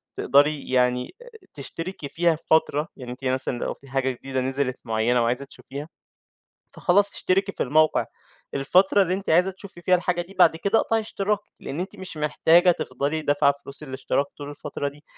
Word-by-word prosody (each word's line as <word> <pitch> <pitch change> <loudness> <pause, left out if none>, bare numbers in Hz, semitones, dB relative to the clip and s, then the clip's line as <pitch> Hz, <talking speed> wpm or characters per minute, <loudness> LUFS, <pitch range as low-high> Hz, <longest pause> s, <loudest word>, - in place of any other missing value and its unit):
تقدري 145 +1 +2
يعني 125 - +1
أ - - -13 0.3
تشتركي 155 +2 -7
فيها 170 +1 +2
فترة، 160 -1 +2
يعني 125 -1 -7
أنتِ 130 +2 -9
مثلًا 130 -1 0
لو - - -2
في 140 - -18
حاجة 130 0 0
جديدة 130 +1 -4
نزلت 130 0 -1
مُعينة 115 +2 +1
وعايزة 125 +4 -1
تشوفيها. 140 +2 -9 0.9
فخلاص 200 +3 +3
اشتركي 195 +2 0
في - - -2
الموقع، 155 +4 +3 0.5
الفترة 185 +8 +4
اللي 185 -1 0
أنتِ 195 -2 -4
عايزة 180 +4 +4
تشوفي 190 -2 -12
فيها 180 +2 +4
الحاجة 175 -1 0
دي 185 +3 -15
بعد 165 -3 +6
كده 200 +6 +2
أقطعي 225 0 +1
اشتراكِك 210 -1 -1 0.2
لأن 150 +6 -5
أنتِ 190 +3 -5
مش 185 -4 -9
محتاجة 165 +3 +4
تفضلي 145 0 -2
دافعة 145 -1 +3
فلوس 140 +2 -8
الاشتراك 135 0 -1
طول 145 -1 -7
الفترة 145 0 -4
دي. 145 +1 -15
150 Hz, 175 wpm, -24 LUFS, 135-180 Hz, 0.9 s, بعد